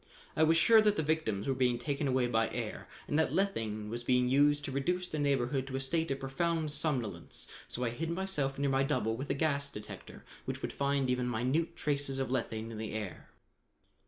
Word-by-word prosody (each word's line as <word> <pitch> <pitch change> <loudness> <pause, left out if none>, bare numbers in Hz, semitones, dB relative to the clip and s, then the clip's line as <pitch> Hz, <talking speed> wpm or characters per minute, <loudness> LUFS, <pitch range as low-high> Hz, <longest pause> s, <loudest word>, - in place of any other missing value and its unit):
I - - +1
was 160 +1 +5
sure 225 +6 +7
that 210 -1 +3
the 160 - 0
victims 145 -10 0
were 135 - +2
being 125 -2 +2
taken 140 +3 -2
away 130 -1 +2
by 115 -2 +1
air - - -5 0.2
and 150 - +1
that 160 - +2
lethane 110 - -1
was 120 +2 -4
being 125 0 +3
used 145 +2 +4
to - - -4
reduce 180 +7 0
the 155 - -4
neighborhood 135 -2 +1
to 135 - -5
a - - 0
state 160 +5 0
of 135 0 -1
profound 155 +3 -1
somnolence, 145 -7 -2 0.2
so 125 - -4
I 120 - 0
hid 160 +7 -3
myself 170 -7 0
near 140 0 +1
my 135 0 +3
double 130 -5 +1
with 135 +4 -5
a - - +1
gas 140 -1 +1
detector 105 -6 -10 0.2
which - - -4
would - - -3
find 140 -1 +1
even 125 0 0
minute 130 +9 0
traces 140 -2 -1
of 135 -1 -1
lethane 115 -3 -2
in 110 - -6
the 110 - -4
air. 105 -4 -5
135 Hz, 215 wpm, -32 LUFS, 125-155 Hz, 0.2 s, sure